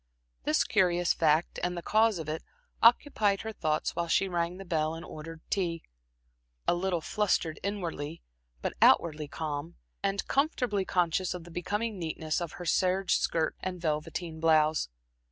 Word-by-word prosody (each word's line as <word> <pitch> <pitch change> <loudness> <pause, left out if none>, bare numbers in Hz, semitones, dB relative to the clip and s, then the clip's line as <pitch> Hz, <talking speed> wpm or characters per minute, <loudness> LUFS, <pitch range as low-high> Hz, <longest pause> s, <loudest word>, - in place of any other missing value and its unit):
This 155 - +3
curious 175 -4 +2
fact, 160 +1 +2
and 180 0 -1
the 170 - -5
cause 220 -1 +3
of 160 -2 -5
it, 155 +1 -3 0.4
occupied 225 -4 +4
her 220 - -4
thoughts 155 -7 -1
while 170 0 -1
she 195 +3 +2
rang 175 0 -1
the 195 - -8
bell 160 -2 0
and 165 +1 -8
ordered 160 +1 -9
tea, 170 -4 -1 0.8
a - - +5
little 175 -1 0
flustered 180 -5 0
inwardly, 170 -6 -4 0.4
but - - -1
outwardly 155 -3 +4
calm, 155 +2 -4 0.3
and 200 0 -1
comfortably 250 - +1
conscious 180 0 +1
of 175 - -7
the 175 - -13
becoming 205 +5 -2
neatness 160 0 -2
of 170 -3 -4
her 175 - -7
serge 185 +2 +2
skirt 160 -1 0
and 185 -1 -4
velveteen 160 +1 -3
blouse. 155 - +3
175 Hz, 155 wpm, -30 LUFS, 160-195 Hz, 0.8 s, a